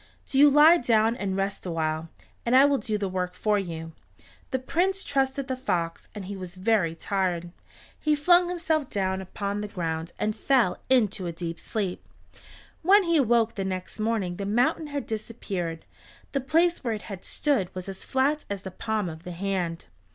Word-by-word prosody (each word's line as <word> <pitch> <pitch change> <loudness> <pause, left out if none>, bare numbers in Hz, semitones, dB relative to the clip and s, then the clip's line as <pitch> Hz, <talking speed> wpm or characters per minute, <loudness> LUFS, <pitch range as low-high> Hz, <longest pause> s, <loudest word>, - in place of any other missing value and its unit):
Do 270 - 0
you 290 +1 +9
lie 300 +4 +7
down 225 -1 +3
and 195 -5 -2
rest 195 +1 -2
awhile, 160 -2 -2 0.3
and 240 +2 +2
I 270 +2 +8
will 285 -1 +3
do 215 0 -2
the 200 -1 -2
work 180 -1 -3
for 210 -1 +1
you." 165 -3 -5 0.6
The 260 - 0
Prince 370 +9 0
trusted 270 0 0
the 260 - -1
fox, 170 -10 -2
and 205 -2 -6
he 200 +2 -5
was 185 -1 -7
very 185 -4 +1
tired. 175 -2 -1 0.5
He 305 -1 +2
flung 350 +4 +4
himself 320 -5 0
down 190 -1 -1
upon 200 +2 -3
the 210 - -3
ground, 165 -3 -3
and 210 0 -1
fell 245 -10 +2
into 215 -7 +2
a - - -2
deep 170 0 -5
sleep. 200 -5 -4 0.7
When 395 +4 +6
he 335 -2 +2
awoke 235 -4 +3
the 195 - -3
next 185 +2 -4
morning 215 -5 -1
the 200 - -3
mountain 245 +8 +1
had 285 -1 -4
disappeared. 200 -7 -4 0.5
The 275 - 0
place 330 +5 +2
where 235 -3 0
it 210 - -8
had 195 -4 -8
stood 270 -12 0
was 185 0 -5
as 195 -1 -7
flat 280 +3 +1
as 200 -1 -4
the 190 - -6
palm 215 +1 -2
of 160 -1 -7
the 180 0 -7
hand. 175 -2 -2
210 Hz, 190 wpm, -26 LUFS, 185-265 Hz, 0.7 s, you